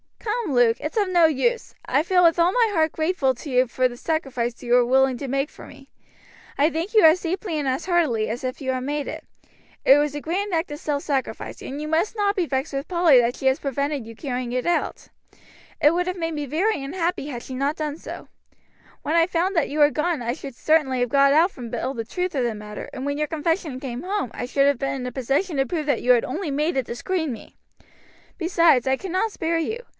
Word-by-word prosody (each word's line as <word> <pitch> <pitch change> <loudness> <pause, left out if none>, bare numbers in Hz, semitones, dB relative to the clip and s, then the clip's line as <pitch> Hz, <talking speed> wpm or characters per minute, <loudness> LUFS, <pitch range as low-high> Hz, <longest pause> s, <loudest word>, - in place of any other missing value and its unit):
Come, 435 - -2
Luke, 240 -2 +4
it's 305 - -5
of 405 -3 +2
no 350 -2 +5
use. 385 - 0
I 270 +3 +2
feel 360 +2 +3
with 335 0 +4
all 340 +1 +4
my 470 0 +3
heart 320 -3 +2
grateful 315 -5 0
to 285 - -9
you 255 0 +3
for 255 +2 +1
the 245 - -9
sacrifice 250 -5 -3
you 240 0 0
were 245 0 +5
willing 265 +1 +3
to 275 - -5
make 275 +3 -1
for - - -12
me. 270 +1 -15 0.7
I 290 +3 +4
thank 335 +8 -4
you 430 - +7
as 320 +3 +6
deeply 350 -1 -2
and 285 - -2
as 260 +1 -1
heartily 305 -12 +1
as 230 +4 -4
if 255 0 -3
you 260 -2 -2
had 255 -1 -2
made 290 +1 -2
it. - - -6 0.6
It 275 - +8
was 295 -1 0
a 295 - -4
grand 380 +5 -2
act 325 -1 -1
of 295 - -6
self 290 -2 -2
sacrifice, 275 -3 -3
and 275 +2 -6
you 305 - -4
must 330 +8 0
not 410 -1 +1
be 360 -5 0
vexed 270 +2 -2
with 275 +1 -3
Polly 340 -8 +5
that 240 +1 0
she - - -8
has 265 0 +3
prevented 280 -1 -2
you 230 - -10
carrying 250 -2 -4
it 250 0 -2
out. 345 0 -1 0.7
It 295 +2 +5
would 355 +1 0
have 365 0 -2
made 330 -1 -2
me 295 -2 -4
very 320 - 0
unhappy 335 +1 -2
had 245 -5 -6
she 260 - -8
not 275 +4 -1
done 305 -2 -3
so. - - -9 0.8
When 310 - -1
I 335 0 +4
found 365 +2 0
that 330 - +1
you 295 - -4
were 295 0 +6
gone 310 -3 -1
I 235 +1 -1
should 275 -1 -9
certainly 285 -3 +2
have 245 - +1
got 275 +2 +4
out 335 +5 +4
from 245 -8 -8
Bill 245 +3 -3
the 230 - -4
truth 360 +8 -3
of 265 -4 0
the 235 -2 -1
matter, 210 0 -8
and 265 0 -6
when 285 0 -2
your 300 - 0
confession 320 -2 -2
came 250 -2 -5
home 380 - -2
I - - -4
should 275 +2 +2
have 280 -3 +2
been 275 0 -1
in 255 -2 -5
a 250 - -4
position 275 +7 -1
to 270 - +2
prove 310 +2 -2
that 285 - 0
you 250 - +3
had 240 -2 +4
only 330 +5 -3
made 300 +5 0
it 265 -3 -1
to 235 - -5
screen 325 +1 -2
me. 230 - -10 0.8
Besides, 335 -7 +3
I 265 0 +2
cannot 380 +5 -1
spare 330 -3 -1
you. 440 +8 -2
290 Hz, 250 wpm, -23 LUFS, 260-335 Hz, 0.8 s, It